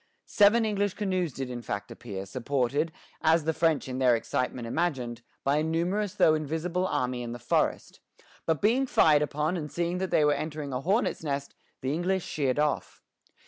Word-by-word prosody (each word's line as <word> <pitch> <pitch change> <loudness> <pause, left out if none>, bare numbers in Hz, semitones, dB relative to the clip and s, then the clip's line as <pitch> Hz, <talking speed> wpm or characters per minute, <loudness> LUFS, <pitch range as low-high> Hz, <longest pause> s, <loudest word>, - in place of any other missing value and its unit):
Seven 220 +3 +4
English 205 -2 0
canoes 185 -5 -1
did 130 0 -5
in 120 -1 -5
fact 100 -3 -5
appear, 100 -5 -6
supported, 135 - -1 0.3
as 160 0 +4
the 160 +1 0
French 160 -2 +1
in 130 0 -4
their 125 -2 +5
excitement 120 +1 -2
imagined, 125 -5 -2 0.2
by 140 +2 +2
a 155 - +1
numerous 180 +5 -1
though 155 - +5
invisible 160 +4 -1
army 125 -4 -1
in 120 -1 -5
the - - -5
forest; 120 - -1 0.5
but 160 0 0
being 250 +6 +3
fired 150 -10 +5
upon, 150 +3 0
and 150 -5 -4
seeing 170 +3 -1
that 190 0 -2
they 150 - +3
were 145 - +4
entering 150 -1 -4
a 125 - -2
hornet's 195 - 0
nest, 140 -2 -3 0.3
the 130 +2 -1
English 180 +3 0
sheered 135 -4 -1
off. 150 0 -1
155 Hz, 185 wpm, -28 LUFS, 130-175 Hz, 0.5 s, their